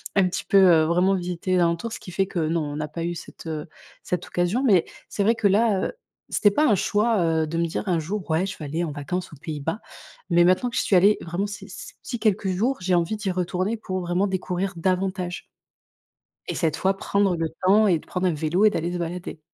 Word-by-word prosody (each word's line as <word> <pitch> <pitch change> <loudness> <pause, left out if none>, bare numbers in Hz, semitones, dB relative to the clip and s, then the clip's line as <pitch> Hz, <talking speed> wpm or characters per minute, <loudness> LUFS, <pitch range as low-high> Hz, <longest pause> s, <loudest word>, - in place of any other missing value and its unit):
un 190 -2 +4
petit 180 - -3
peu, 200 - +3
heu, 175 -5 +6
vraiment 180 +4 +3
visiter 180 +1 -3
les 180 - +4
alentours, 170 +7 0
ce - - -6
qui 180 - -9
fait 190 +2 0
que 180 - -3
non, 165 +1 0
on 145 -1 -5
n'a 150 0 -3
pas 165 +2 -5
eu, 175 - -1
heu, 175 - -5
cette 165 0 -9 0.5
cette 180 0 -2
occasion, 175 +8 0
mais 195 -10 +4 0.2
c'est 205 - -1
vrai 225 +3 +3
que 225 -2 +2
là, 205 -1 +2
heu, - - -7 0.4
c'était 205 - +4
pas 300 +10 +2
un 220 - +4
choix, 215 +3 +1
heu, 160 -1 +1
de 165 +2 -3
me 170 - +1
dire: 180 +5 -4
«Un 175 -3 +2
jour, 185 +5 -4
ouais, 165 +4 +2
je 195 - -6
vais 150 - -7
aller 160 +4 -2
en 165 - -3
vacances 165 +6 -4
aux - - -10
Pays-Bas», 155 +5 -4 0.5
mais 175 0 +5
maintenant 185 +7 +3
que - - -7
j'y - - +2
suis 195 - +1
allée, 200 +4 +5
vraiment, 175 +4 -2
c 200 -1 -7
ces 190 - -9
petits 240 - -5
quelques 210 -3 +1
jours, 230 +9 0
j'ai 180 0 +1
envie 175 +5 +1
d'y 210 -2 -3
retourner 185 +4 -1
pour 185 -3 -4
vraiment 175 +2 0
découvrir 190 0 -2
davantage 185 +1 -2 1.0
et - - -3
cette 160 -3 0
fois, 190 +1 +1
prendre 200 -2 +1
le 165 -1 -2
temps 205 +3 +5
et 175 - +4
de - - -18
prendre 185 0 -1
un 175 - +1
vélo 160 +7 +1
et - - +7
d'aller 170 -3 -2
se - - -2
balader. 170 -1 -5
180 Hz, 245 wpm, -24 LUFS, 170-200 Hz, 1.0 s, et